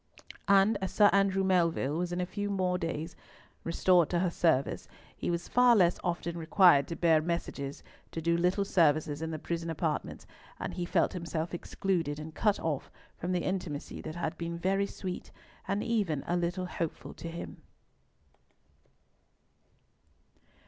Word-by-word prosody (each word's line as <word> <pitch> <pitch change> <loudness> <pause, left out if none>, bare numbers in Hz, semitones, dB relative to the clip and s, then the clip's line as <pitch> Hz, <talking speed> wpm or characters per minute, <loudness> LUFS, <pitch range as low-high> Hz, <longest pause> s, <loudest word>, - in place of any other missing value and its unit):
And 200 +2 +5
as 190 - -2
Sir 205 -1 +5
Andrew 195 -1 +3
Melville 170 -6 +2
was 175 0 -2
in 175 - -2
a 180 - 0
few 205 +2 -4 0.3
days 165 0 -4
more - - -26
restored 175 0 +3
to 175 - 0
her 175 0 +1
service, 160 -6 +1 0.3
he - - -3
was 175 0 -2
far 245 -1 +5
less 180 -4 +3
often 170 -1 -2
required 160 -3 +5
to 165 - -4
bear 165 -2 +4
messages, 155 -4 -4 0.3
or - - +1
do 170 +1 +1
little 180 +4 +1
services 155 -4 +2
in 160 - -2
the 160 - -3
prison 170 +1 -4
apartments, 160 -1 -3 0.3
and - - -4
he 175 - -3
felt - - +1
himself 170 -2 -3
excluded, 170 -4 -2
and 155 +1 -8
cut 210 +3 +1
off 150 -4 -2 0.3
from 175 - -4
the 180 -1 0
intimacy 180 -6 -4
that 155 0 -7
had 165 -2 -3
been 170 0 -3
very 195 +3 +1
sweet, 185 -2 -6 0.4
and 200 +1 0
even 200 -12 0
a 175 - 0
little 175 +1 -1
hopeful 170 -3 -5
to 170 - -7
him. 170 +1 -8
170 Hz, 160 wpm, -30 LUFS, 160-185 Hz, 0.4 s, And